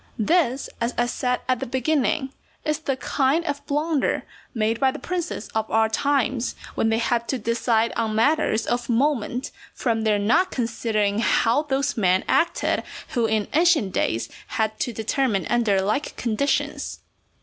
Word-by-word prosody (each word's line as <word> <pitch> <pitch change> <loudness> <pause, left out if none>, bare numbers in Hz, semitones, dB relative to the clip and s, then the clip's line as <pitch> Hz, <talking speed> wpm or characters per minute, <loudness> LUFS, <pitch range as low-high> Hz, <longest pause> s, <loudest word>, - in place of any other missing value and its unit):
This, 270 - +1
as 235 +1 -1
I 240 - +3
said 250 +1 -1
at 255 -2 +1
the - - -4
beginning, 265 +1 0 0.3
is 305 -1 0
the 275 -4 -2
kind 280 +5 +1
of 285 -2 -3
blunder 300 0 0 0.3
made 225 -1 0
by 265 - +4
the - - -4
princes 350 -11 -4
of 220 0 -2
our 220 0 +3
times 260 0 0 0.2
when 225 - +1
they 225 - +2
have 235 0 0
to 265 - -1
decide 230 -1 +1
on 220 -2 -1
matters 230 -2 +2
of 240 0 -2
moment, 255 0 0 0.2
from 230 -3 0
their 215 -1 +2
not 230 - +3
considering 220 - -1
how 230 +3 +3
those 275 -4 -1
men 185 -3 +3
acted 340 - +1 0.3
who 235 -2 +1
in 215 -1 0
ancient 315 - +3
days 115 +1 0 0.2
had 220 -1 -1
to 245 - -1
determine 225 -2 0
under 230 -5 +3
like 210 +10 -1
conditions. 240 +4 -1
240 Hz, 160 wpm, -24 LUFS, 220-280 Hz, 0.3 s, by